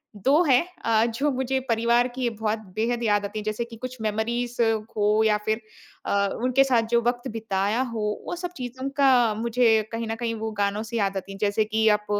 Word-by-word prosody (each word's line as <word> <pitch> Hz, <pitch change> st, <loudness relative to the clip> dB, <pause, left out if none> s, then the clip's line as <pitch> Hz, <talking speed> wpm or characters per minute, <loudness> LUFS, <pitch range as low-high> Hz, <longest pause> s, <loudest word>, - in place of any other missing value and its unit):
2 270 Hz, -, +3 dB
हैं 265 Hz, -4 st, +4 dB, 0.2 s
अ, 225 Hz, 0 st, +3 dB
जो 285 Hz, +5 st, +1 dB
मुझे 265 Hz, +1 st, -1 dB
परिवार 235 Hz, +2 st, +3 dB
की 255 Hz, -2 st, 0 dB
बहुत 220 Hz, -1 st, -2 dB, 0.2 s
बेहद 235 Hz, +2 st, -1 dB
याद 205 Hz, -2 st, +2 dB
आती 210 Hz, +2 st, -4 dB
है। -, -, -6 dB
जैसे 215 Hz, +2 st, -2 dB
कि 235 Hz, -1 st, -11 dB
कुछ 255 Hz, +2 st, -7 dB
मेमोरीज़ 230 Hz, +3 st, -1 dB, 0.4 s
हो 210 Hz, +1 st, +3 dB
या 210 Hz, -1 st, +3 dB
फिर 220 Hz, +1 st, 0 dB, 0.4 s
अ, -, -, -2 dB, 0.3 s
उनके 255 Hz, +2 st, +4 dB
साथ 250 Hz, -4 st, +3 dB
जो 235 Hz, 0 st, +4 dB
वक़्त 240 Hz, +2 st, -1 dB
बिताया 215 Hz, +1 st, -1 dB
हो, 235 Hz, -3 st, -3 dB, 0.3 s
वो -, -, -3 dB
सब 350 Hz, 0 st, -5 dB
चीज़ों 255 Hz, +2 st, -5 dB
का 255 Hz, -5 st, +4 dB
मुझे 225 Hz, 0 st, +3 dB
कहीं 230 Hz, 0 st, -3 dB
ना 225 Hz, -, -2 dB
कहीं 230 Hz, 0 st, -2 dB
वो 220 Hz, 0 st, -4 dB
गानों 200 Hz, +1 st, 0 dB
से 225 Hz, +1 st, -4 dB
याद 200 Hz, -2 st, 0 dB
आती 195 Hz, +1 st, -6 dB
हैं। 195 Hz, -, -8 dB
जैसे 210 Hz, +1 st, +2 dB
कि 220 Hz, +1 st, +1 dB
आप 210 Hz, 0 st, +2 dB
230 Hz, 210 wpm, -25 LUFS, 215-245 Hz, 0.4 s, हैं